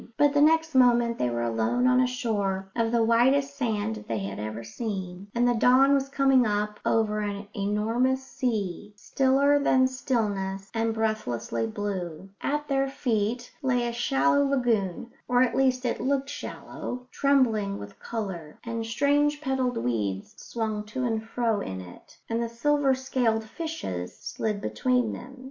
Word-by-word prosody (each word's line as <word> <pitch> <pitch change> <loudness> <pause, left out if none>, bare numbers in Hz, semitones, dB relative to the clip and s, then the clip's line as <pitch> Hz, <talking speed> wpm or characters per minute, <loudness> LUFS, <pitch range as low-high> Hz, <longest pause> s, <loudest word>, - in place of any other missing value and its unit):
But 290 -1 +4
the 290 - +3
next 320 +1 +4
moment 240 -2 +4
they 125 - +1
were 120 0 -2
alone 115 - +1
on 255 0 +5
a 255 - +3
shore 200 -6 -2
of 230 -1 +1
the 235 -1 +3
whitest 265 +5 +3
sand 220 -5 -1
that - - -10
they 115 - -1
had 100 0 -4
ever 110 +2 -5
seen, 190 - -5
and 240 +1 +3
the 245 - +4
dawn 255 +4 +5
was 275 -1 +1
coming 270 -2 +4
up 210 -1 -1
over 215 -1 +1
an 205 -1 -4
enormous 225 +6 0
sea, 210 -6 -3
stiller 275 +5 +2
than 260 -2 +4
stillness 205 -7 -2
and 225 0 0
breathlessly 120 - -1
blue. 185 - -5
At 295 +1 -1
their 275 -1 +1
feet 240 -2 -1
lay 245 -3 +1
a 235 - -3
shallow 275 +5 +2
lagoon 235 -7 0 0.2
or 245 +1 +4
at 240 -2 0
least 260 -1 +2
it 240 - -1
looked 275 +1 0
shallow 250 -3 -6
trembling 230 -8 +2
with 100 - -10
colour; 190 -9 -5
and 230 -1 -3
strange 285 +5 +2
petalled 265 -3 -1
weeds 105 -5 -2
swung 220 -2 -3
to 255 +5 -4
and 225 -3 -1
fro 225 -1 0
in 95 - -5
it, 90 -1 -13
and 230 +1 -1
the 235 - -2
silver 275 +3 +2
scaled 250 -4 0
fishes 220 - -5
slid 210 -2 -3
between 250 -1 0
them. 260 +2 -9
230 Hz, 160 wpm, -27 LUFS, 200-260 Hz, 0.2 s, on